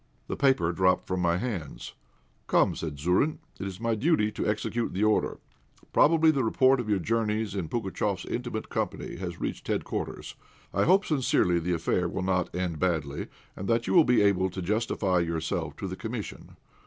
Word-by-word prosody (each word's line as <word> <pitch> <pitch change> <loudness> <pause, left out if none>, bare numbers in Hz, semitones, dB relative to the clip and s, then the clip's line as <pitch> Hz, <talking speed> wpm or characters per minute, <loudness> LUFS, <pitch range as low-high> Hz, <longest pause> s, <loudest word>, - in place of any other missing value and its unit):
The - - -4
paper 130 - +3
dropped 90 +1 +2
from 95 0 -2
my 85 -1 +2
hands. 95 - -5 0.5
"Come," - - +3
said 75 -3 -5
Zourine, 90 - +1 0.2
"it 100 - -3
is 95 -1 -7
my 115 0 0
duty 110 -2 +2
to - - -3
execute 110 +2 -1
the 100 - 0
order. 110 0 +2 0.6
Probably 160 +1 +5
the 140 -4 0
report 130 +3 +4
of 115 -3 -3
your 105 - +3
journeys 110 +1 -1
in 90 -6 -3
Pugatchéf's 100 -3 -2
intimate 120 -3 -4
company - - -3
has 85 -2 -5
reached - - -4
headquarters. - - -3 0.4
I - - +2
hope 195 +3 +4
sincerely 120 - +2
the 90 +2 -1
affair 85 +1 0
will 95 - -3
not 90 -2 0
end 90 -3 -2
badly, 80 -6 -1 0.3
and 95 - -6
that 115 0 +1
you - - -1
will 170 - +8
be 125 -6 +4
able 95 -2 +3
to 95 +1 -6
justify 100 -2 0
yourself 80 -1 -2
to - - -5
the - - -5
Commission. - - -7
100 Hz, 180 wpm, -28 LUFS, 90-115 Hz, 0.6 s, will